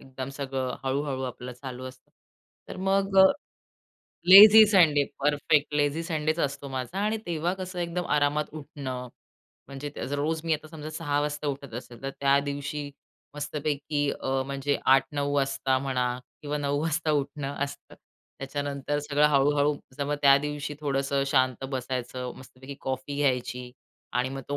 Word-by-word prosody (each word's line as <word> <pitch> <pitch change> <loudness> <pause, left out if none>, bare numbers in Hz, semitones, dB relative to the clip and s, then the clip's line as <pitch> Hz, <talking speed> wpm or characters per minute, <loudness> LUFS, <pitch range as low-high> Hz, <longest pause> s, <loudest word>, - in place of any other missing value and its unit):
एकदम 130 0 -7
सगळं 130 -2 -3
हळू-हळू 135 0 -1
आपलं 125 -1 -6
चालू 130 0 -8
असतं. 130 0 -11 0.6
तर - - -7
मग 195 0 +1
अ, 190 - +10 1.1
लेझी 215 +3 +11
संडे 155 -7 +5 0.2
परफेक्ट 145 +1 +2
लेझी 145 +3 +1
संडेच 155 -1 -1
असतो 140 -1 -2
माझा 130 +6 -4
आणि 215 +1 0
तेव्हा 170 +1 -1
कसं 185 -1 -6
एकदम 175 +1 -2
आरामात 145 +1 +1
उठणं. 130 -4 -6 0.6
म्हणजे 140 +2 -7 0.2
रोज 155 +3 -1
मी 165 - +1
आता 155 +1 -7
समजा 155 -1 -8
6:00 145 -2 -1
वाजता 150 0 -3
उठत 140 -4 -4
असेल 120 0 -9
तर 135 - -3
त्या 140 0 +4
दिवशी 145 +1 -4 0.4
मस्तपैकी 145 0 -2
अ, 135 0 0
म्हणजे 140 +1 -1
8:00, 135 0 +6
9:00 145 0 -1
वाजता 135 -1 +1
म्हणा 130 -2 -1 0.3
किंवा 150 0 -2
9:00 145 0 -1
वाजता 160 -1 0
उठणं 140 0 -5
असतं. 140 - -11 0.4
त्याच्यानंतर 140 +1 -3
सगळं 145 0 +2
हळू-हळू 145 +1 +3 0.3
मग 145 - -1
त्या 140 -1 +8
दिवशी 150 0 -4
थोडंसं 140 -1 0
शांत 130 -2 +1
बसायचं, 125 -1 -4
मस्तपैकी 130 +2 -11
कॉफी 130 +2 -4
घ्यायची 125 -3 -1 0.4
आणि 125 +1 0
मग 135 +1 -5
तो 145 - -1
145 Hz, 150 wpm, -27 LUFS, 135-150 Hz, 1.1 s, लेझी